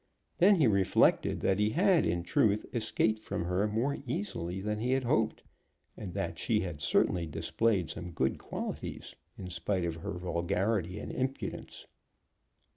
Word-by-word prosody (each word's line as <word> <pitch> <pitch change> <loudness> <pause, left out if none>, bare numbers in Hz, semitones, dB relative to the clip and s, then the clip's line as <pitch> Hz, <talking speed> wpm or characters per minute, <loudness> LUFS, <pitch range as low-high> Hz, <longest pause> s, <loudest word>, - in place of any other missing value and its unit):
Then 195 +3 +7
he 160 -6 +4
reflected 100 -5 +3
that 95 +1 +2
he 105 0 +3
had, 180 - +3
in 85 0 0
truth, 100 +4 +2
escaped 110 -1 0
from 85 - -3
her 90 +4 +1
more 115 +7 -1
easily 95 - -3
than 105 +2 -2
he 125 +3 +1
had 135 0 +1
hoped, 115 -3 +1 0.5
and 100 -4 -6
that 85 0 -3
she 110 -3 +1
had 85 -5 -5
certainly 85 +3 +2
displayed 85 +5 0
some 90 - -6
good 65 -5 -1
qualities - - -6 0.2
in 90 -1 -7
spite 90 0 -1
of 85 -1 -3
her 80 - -5
vulgarity 90 +2 -1
and - - -6
impudence. 130 +1 -4
100 Hz, 155 wpm, -31 LUFS, 85-115 Hz, 0.5 s, Then